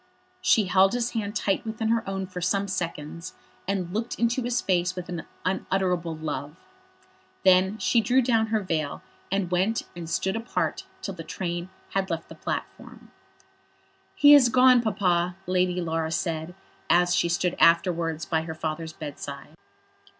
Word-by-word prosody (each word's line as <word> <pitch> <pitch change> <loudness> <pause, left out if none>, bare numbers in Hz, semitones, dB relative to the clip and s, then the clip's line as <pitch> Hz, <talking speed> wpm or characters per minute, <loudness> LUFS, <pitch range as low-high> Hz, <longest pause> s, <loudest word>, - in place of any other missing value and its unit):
She 215 - +4
held 190 +1 +4
his 240 -1 -1
hand 210 -3 -3
tight 195 -2 0
within 220 0 -3
her 230 0 +2
own 195 0 -3
for 180 -1 -7
some 200 +3 0
seconds, 165 - -5 0.3
and 185 -3 -2
looked 225 +3 -3
into 235 +2 +1
his 245 0 0
face 180 -1 0
with 180 -1 -6
an 175 -3 -5 0.2
unutterable 180 -3 -1
love. 150 -2 -5 0.9
Then 190 +2 +5
she 230 +1 +2
drew 250 +4 +3
down 225 -2 +2
her 220 -1 0
veil, 155 -6 -3 0.3
and 195 -2 -1
went 190 +5 +1
and 170 -2 -7
stood 190 +3 0
apart 225 +2 -2 0.2
till - - -3
the - - -8
train 175 -1 -4 0.2
had 195 0 -1
left 165 -1 -4
the - - -9
platform. - - -6 1.0
"He 290 0 +8
has 270 -4 +7
gone, 255 0 +6
Papa," 180 -5 +1
Lady 180 0 +1
Laura 165 -2 -2
said, 165 +1 -2 0.3
as 175 0 +4
she 170 - +2
stood 175 +1 0
afterwards 165 -1 +3
by 160 -2 0
her 160 0 -6
father's 160 0 -4
bedside. 150 -3 -8
185 Hz, 155 wpm, -26 LUFS, 170-215 Hz, 1.0 s, He